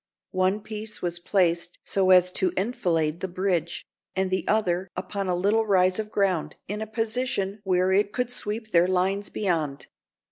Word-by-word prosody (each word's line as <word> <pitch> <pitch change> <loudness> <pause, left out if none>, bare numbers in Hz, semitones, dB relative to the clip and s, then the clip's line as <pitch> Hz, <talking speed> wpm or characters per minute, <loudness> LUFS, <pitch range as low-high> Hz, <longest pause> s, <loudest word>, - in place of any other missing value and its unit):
One 185 +3 +1
piece 215 -1 -6
was 175 -1 -1
placed 175 -2 +1
so 190 -1 +1
as 180 -1 +6
to 185 -1 +1
enfilade 170 -7 0
the 190 - -3
bridge, 180 -2 -1 0.3
and 190 0 0
the 185 - -1
other 190 -4 +1
upon 195 +2 -3
a 180 - +1
little 210 +5 +2
rise 185 -1 +3
of 215 -1 -3
ground, 195 -6 0
in 210 +2 -4
a 220 - -3
position 220 -2 -2
where 185 0 +2
it 200 +1 +2
could 250 +1 -2
sweep 220 -1 -5
their 175 -1 +5
lines 190 +2 0
beyond. 160 -8 -1
190 Hz, 170 wpm, -26 LUFS, 180-210 Hz, 0.3 s, as